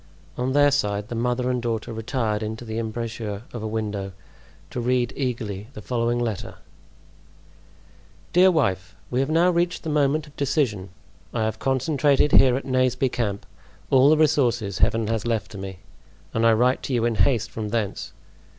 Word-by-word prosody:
On 125 +1 -1
their 145 0 +5
side 105 -5 -1
the - - -4
mother 125 +2 0
and 125 -1 -1
daughter 115 -1 -3
retired 110 -1 -2
into 110 +2 -5
the 110 0 -4
embrasure 110 -2 -4
of 120 - -5
a 110 - -3
window 105 -3 -3 0.6
to 125 - -3
read 125 0 +1
eagerly 110 -6 -3
the 105 - -8
following 120 0 0
letter: 115 -5 -3 1.8
"Dear 185 +2 +6
Wife,—We 95 - -1
have 135 +2 0
now 170 +3 +4
reached 175 +1 0
the 160 - -3
moment 150 +1 +2
of 145 -1 -18
decision. 130 - 0 0.5
I 110 - +1
have 110 0 -2
concentrated 140 +2 +2
here 130 -1 +6
at 135 - -6
Naseby 130 0 +1
camp 105 -5 -3 0.5
all 135 +1 +6
the 155 - +5
resources 120 - +2
Heaven 115 0 +2
has 115 +1 -2
left 115 -3 -2
me, 95 -1 -7 0.6
and 115 +1 +3
I 115 - +6
write 125 +3 +2
to 135 - -4
you 115 -1 +1
in 120 - +1
haste 110 +3 +1
from 110 -2 -4
thence. 105 -3 -2
120 Hz, 170 wpm, -24 LUFS, 110-135 Hz, 1.8 s, Dear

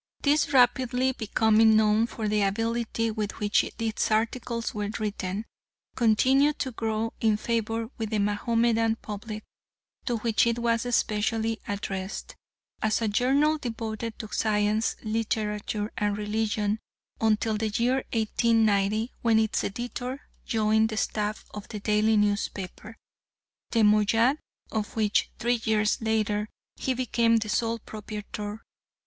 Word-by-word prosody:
This 290 0 +3
rapidly 255 0 +3
becoming 220 -1 +3
known 215 +1 +4
for 220 -2 -4
the 210 0 +1
ability 230 +2 0
with 215 -1 -3
which 210 -1 +3
its 225 -1 -2
articles 230 +1 -1
were 210 -1 -3
written, 205 -1 -3 0.5
continued 265 +5 +3
to 260 - -2
grow 225 -1 -2
in 220 -2 +3
favour 225 0 -1
with 220 -1 -2
the 215 - 0
Mahomedan 225 +2 +1
public, 215 0 -7 0.6
to 240 -2 +1
which 230 +1 +2
it 235 0 +1
was 235 0 0
specially 220 +1 0
addressed, 195 -1 -4 0.5
as 215 0 +1
a 225 - 0
journal 275 +8 +2
devoted 225 -2 -4
to 215 - -6
science, 215 0 +1
literature, 215 -1 -2
and 205 -1 0
religion, 210 0 -1 0.4
until 220 0 +2
the 215 +1 -1
year 240 +5 +1
1890 220 -1 +2
when 230 -2 +3
its 220 -1 +1
editor 245 +5 -4 0.3
joined 220 0 +2
the 215 - -4
staff 210 0 -2
of 210 -1 -7
the 210 - -6
daily 210 +1 +2
newspaper, 205 +1 -2 0.7
the 230 -2 +2
Moayyad, 225 +6 +4 0.3
of 215 -1 -3
which, 215 -2 +1
three 240 0 0
years 215 0 +1
later, 215 -1 0 0.3
he 260 - -1
became 235 -2 +2
the 220 -1 -2
sole 230 +1 0
proprietor. 210 0 -7
220 Hz, 130 wpm, -27 LUFS, 210-230 Hz, 0.7 s, known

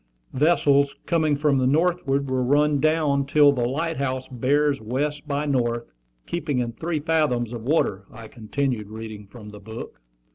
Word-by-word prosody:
"'Vessels 140 -1 +3
coming 155 -3 +1
from 145 -2 +2
the 130 - +2
northward 140 -2 +1
will 130 -1 0
run 145 +2 +2
down 155 -2 +2
till 145 +1 +5
the 125 -3 0
light 160 +5 -2
house 130 -1 -2
bears 140 +3 +1
west 145 +6 -3
by 145 0 -1
north, 120 - -1 0.3
keeping 155 -5 -2
in 120 -1 -1
three 160 +5 -3
fathoms 145 -7 0
of 120 - -5
water,'" 110 -8 0
I 115 0 -10
continued, 120 -1 -3
reading 110 -2 -8
from 105 +1 -12
the 105 - -11
book. 110 - -9
140 Hz, 160 wpm, -24 LUFS, 120-150 Hz, 0.3 s, till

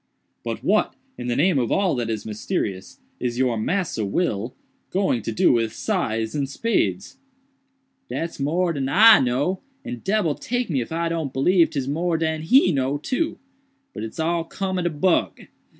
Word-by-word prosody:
"But - - -4
what, - - +2 0.2
in 120 - -6
the 120 - 0
name 165 +1 +3
of 120 - -1
all 195 -2 +2
that 120 -2 -2
is 110 -2 -3
mysterious, 105 +2 -4 0.2
is 120 -1 -2
your 125 -2 +2
'Massa 160 - -1
Will' 110 - -1 0.3
going 185 - +1
to 115 - -4
do 110 - +3
with 115 -2 0
scythes 115 - -1
and 140 -3 -2
spades?" 125 - -1 0.9
"Dat's 165 -2 -4
more 170 +5 +1
dan 135 -3 -2
I 215 +8 +8
know, 135 +9 0 0.2
and 245 -1 -6
debbil 195 -6 +1
take 245 +4 -3
me 135 -4 +1
if 120 - -7
I 170 +1 -1
don't 165 -4 -2
b'lieve 165 +6 +3
'tis 135 -2 -3
more 165 +4 0
dan 160 -1 -1
he 185 - +5
know, 135 -1 0
too. 260 - -2 0.6
But - - -6
it's 110 +6 -7
all 165 +1 0
cum 185 +2 -3
ob 175 - -2
do - - +2
bug." 165 +3 +1
150 Hz, 180 wpm, -23 LUFS, 120-180 Hz, 0.9 s, I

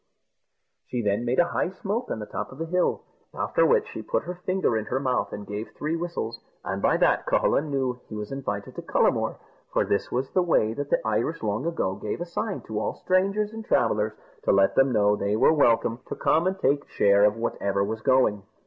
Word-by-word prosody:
She 125 -2 -2
then 105 +3 0
made 125 +2 0
a 175 0 +4
high - - 0
smoke 210 +5 -3
on - - -2
the 105 - -5
top - - -5
of 135 - -11
the 165 - -3
hill, 180 +2 0 0.3
after - - +2
which 475 -2 +3
she - - -7
put - - -1
her 180 - -5
finger 185 -6 0
in 110 -1 -1
her 130 - -1
mouth, 130 -2 0
and 105 - -6
gave 105 +2 -5
three 155 +2 -1
whistles, 165 -9 -4 0.3
and - - -3
by - - +3
that - - +2
Cucullin 150 +1 +2
knew 130 -3 -1
he 110 - -6
was 105 +2 -5
invited 105 -7 -4
to - - -3
Cullamore - - +1 0.4
for - - +1
this 100 - -1
was 130 +2 -2
the 185 - +3
way 135 -11 +2
that 145 +3 -4
the - - +3
Irish 115 +9 -1
long 110 +8 -1
ago 165 - -1
gave 105 - -4
a 175 - -3
sign 195 +4 -3
to 110 -1 -4
all - - -2
strangers 195 +3 +1
and 225 0 -6
travellers, - - +1 0.3
to - - +2
let 290 - +4
them 135 0 +4
know 105 -2 +3
they 100 0 -1
were 115 - +5
welcome 115 -5 +3
to - - -4
come 165 +3 +2
and 190 +1 -1
take 140 -4 0
share 100 0 +4
of 105 0 +4
whatever 100 -4 -1
was 110 +2 -3
going. 125 -5 +3
130 Hz, 220 wpm, -26 LUFS, 110-175 Hz, 0.4 s, were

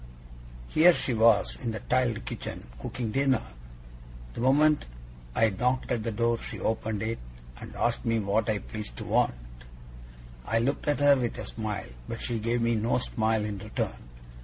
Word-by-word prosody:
Here 170 +2 +6
she 130 - -1
was, 115 -1 +4
in 115 -2 -2
the 110 - -4
tiled 120 -4 0
kitchen, - - -6 0.2
cooking 115 -3 -3
dinner! 135 -1 +2 0.9
The - - -5
moment 145 - +4 0.5
I 115 -1 +4
knocked 125 +7 0
at 120 -3 +1
the 115 +1 -2
door 115 +1 +1
she - - -7
opened 110 -1 -1
it, 115 +1 -2 0.4
and - - -9
asked 120 0 0
me 115 -2 +1
what 105 +1 +1
I 110 - +2
pleased 105 - -7
to - - -5
want. - - +2 1.1
I 115 - 0
looked 130 +7 0
at 145 -2 +1
her 145 0 +7
with 125 -3 -2
a - - -5
smile, 110 -3 -4 0.2
but 115 - -4
she 120 -2 -2
gave 115 +2 0
me 115 0 +2
no 115 +2 +1
smile 110 -2 0
in 105 -2 -4
return. - - -4
115 Hz, 175 wpm, -28 LUFS, 110-125 Hz, 1.1 s, her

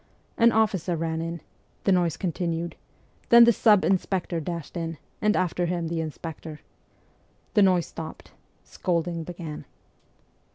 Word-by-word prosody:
An 235 0 +5
officer 200 -6 +1
ran 160 0 -2
in 165 -1 -4 0.4
the 195 - +2
noise 175 -3 +2
continued; 170 -1 -2 0.5
then 235 0 +9
the 235 0 +6
sub 210 -2 +4
inspector 185 -2 0
dashed 170 +1 -6
in, 165 -2 -3 0.2
and 210 0 +3
after 180 -1 0
him 170 -2 -2
the 165 -1 -1
inspector. 160 0 -7 0.9
The 210 - +4
noise 185 -3 +4
stopped. 160 -1 -9 0.3
Scolding 170 -1 -2
began. 165 -3 -7
170 Hz, 130 wpm, -26 LUFS, 165-190 Hz, 0.9 s, then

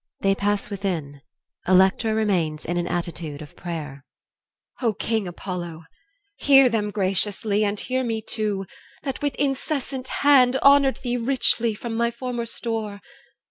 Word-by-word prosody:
[They 195 0 +3
pass 205 +1 -1
within. 170 -8 -4 0.5
ELECTRA 190 +4 +4
remains 175 -8 0
in 175 - -2
an 175 0 -1
attitude 170 -4 -4
of 150 -2 -11
prayer 150 -6 -6 0.8
EL. 245 - +1
O - - -1
King 220 -1 -1
Apollo! 175 -2 -6 0.5
hear 270 -2 +6
them 215 -3 -1
graciously, 205 +1 +1
And 205 0 -1
hear 260 0 -1
me 225 -2 -1
too, 210 -3 -2 0.4
that 270 -2 -4
with 290 -2 -1
incessant 270 -1 -2 0.2
hand 260 -3 +6
Honoured 280 -1 +5
thee 245 -1 -1
richly 235 -2 +2
from 230 +2 -5
my 235 +1 +1
former 235 0 -4
store! 220 -3 -3
210 Hz, 140 wpm, -24 LUFS, 185-245 Hz, 0.8 s, hear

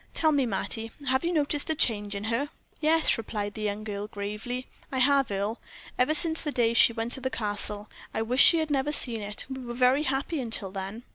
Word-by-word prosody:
"Tell 315 -1 +3
me, 280 -4 +1
Mattie, 225 +2 -4 0.2
have 260 +3 +1
you 340 - 0
noticed 295 -2 0
a 315 - +1
change 210 -7 +1
in 200 - -5
her?" 230 +6 -1 0.3
"Yes," 315 -4 +2
replied 205 -2 -4
the 215 - -8
young 210 0 -3
girl, 205 -1 -5
gravely, 210 +5 -5 0.3
"I 265 - -3
have, 275 0 +3
Earle, 200 +3 -3 0.4
ever 255 +5 +3
since 320 0 +7
the 300 - -3
day 235 -4 +1
she 230 - +6
went 230 +1 -4
to 265 - -5
the 260 - -2
Castle. 210 -2 -3 0.2
I 220 - -2
wish 250 +4 +1
she 335 - +8
had 315 -2 -2
never 280 +1 0
seen 235 -6 +2
it. 205 0 -5
We 265 -1 -7
were 240 -1 -7
very 255 +3 +3
happy 275 +2 -1
until 225 -5 -4
then." 195 +4 -7
240 Hz, 220 wpm, -27 LUFS, 210-280 Hz, 0.4 s, she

